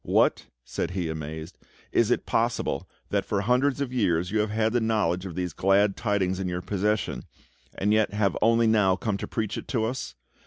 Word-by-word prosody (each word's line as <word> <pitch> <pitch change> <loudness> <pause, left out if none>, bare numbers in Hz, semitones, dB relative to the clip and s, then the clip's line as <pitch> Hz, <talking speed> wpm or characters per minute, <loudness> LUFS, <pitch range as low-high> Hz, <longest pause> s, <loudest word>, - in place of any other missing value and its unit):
"What!" - - +2 0.2
said - - -3
he, 85 -3 -1
amazed; 80 +2 -6 0.3
"is - - +3
it - - +1
possible - - 0 0.2
that - - +1
for 100 - -1
hundreds 125 +6 +2
of 130 -2 -2
years 90 -7 +1
you 110 - +1
have 105 0 +1
had 110 +1 +1
the 120 - +2
knowledge 100 -5 0
of 85 - -8
these 90 -2 -2
glad 100 +3 +3
tidings 95 -4 0
in 95 - -2
your 90 0 -3
possession, 105 +2 -1 0.5
and 105 +2 +1
yet 110 -1 +3
have 105 -2 +1
only 115 0 +4
now 105 -4 +4
come 105 -1 -2
to - - -5
preach 110 -3 -2
it - - -11
to 115 -4 0
us? 110 - -4
105 Hz, 200 wpm, -26 LUFS, 90-110 Hz, 0.5 s, only